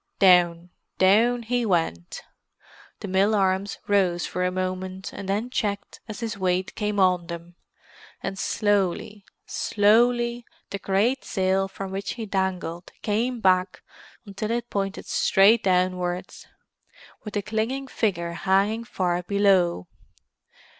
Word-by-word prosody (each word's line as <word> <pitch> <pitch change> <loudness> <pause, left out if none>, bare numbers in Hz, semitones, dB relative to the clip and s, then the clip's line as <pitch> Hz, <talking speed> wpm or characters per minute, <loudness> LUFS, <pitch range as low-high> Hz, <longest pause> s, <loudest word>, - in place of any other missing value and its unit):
Down—down 185 +5 +3
he 245 +2 0
went. 165 - -1 0.8
The - - -5
mill 195 +3 +2
arms 195 0 0
rose 185 -4 +2
for 180 - -3
a 180 - +2
moment, 185 +1 -4
and 195 -1 -7
then 215 +5 -1
checked 205 -5 -3
as 215 +1 -7
his 225 -3 -4
weight 185 0 0
came 210 -1 -2
on 180 -2 +3
them—and 170 +2 -10
slowly—slowly, 215 +4 +1 0.3
the 200 - -4
great 215 +9 +1
sail 190 0 0
from 195 0 -7
which 195 +1 -4
he 230 -2 -6
dangled 190 -3 -3
came 230 +3 -1
back 185 -1 +2 0.4
until 200 +1 -5
it 240 +1 -2
pointed 195 -1 -3
straight 210 +3 +4
downwards, 180 -1 -1 0.8
with 210 -2 -7
the 205 - -1
clinging 225 +6 -2
figure 180 -9 -1
hanging 195 +5 +1
far 180 -6 -1
below. 185 - +2
195 Hz, 120 wpm, -25 LUFS, 185-215 Hz, 0.8 s, straight